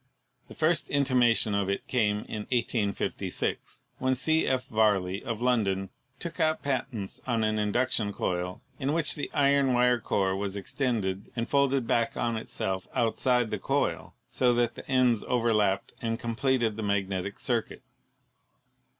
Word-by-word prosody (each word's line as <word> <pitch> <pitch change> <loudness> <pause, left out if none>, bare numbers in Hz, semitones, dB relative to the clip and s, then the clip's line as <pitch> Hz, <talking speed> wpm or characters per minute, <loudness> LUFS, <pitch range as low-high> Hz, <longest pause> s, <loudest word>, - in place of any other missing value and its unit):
The - - -12
first 155 -1 +1
intimation 125 -6 +3
of 100 -1 0
it 100 - -2
came 105 -4 +1
in 105 -1 -6
1856, 115 -4 -2 0.2
when 130 0 +1
C. 160 +4 +2
F. 130 -1 0
Varley, 100 -3 +1
of 115 +1 -4
Lon 125 -3 +3
don, 95 0 -2 0.3
took 170 -4 -6
out 155 0 +2
patents 120 -7 -3
on 115 -3 +1
an 110 0 +1
induction 105 0 0
coil 90 -2 -3 0.2
in 140 +1 0
which 160 -2 +2
the 145 - -4
iron 140 -2 +3
wire 125 0 +4
core 95 -3 0
was 100 0 -3
extended 100 -3 -2
and 115 0 -2
folded 140 -2 +2
back 115 0 0
on 115 -1 0
itself 95 -4 -3
out 115 -1 +1
side 125 -3 +2
the - - -2
coil, - - -1 0.2
so 125 -2 +3
that 120 -1 +1
the - - -11
ends 125 -4 +3
overlapped 105 -5 +1
and 115 -1 -1
completed 115 -1 0
the - - -3
magnetic 100 -1 -1
circuit. - - -2
115 Hz, 155 wpm, -28 LUFS, 100-130 Hz, 0.3 s, wire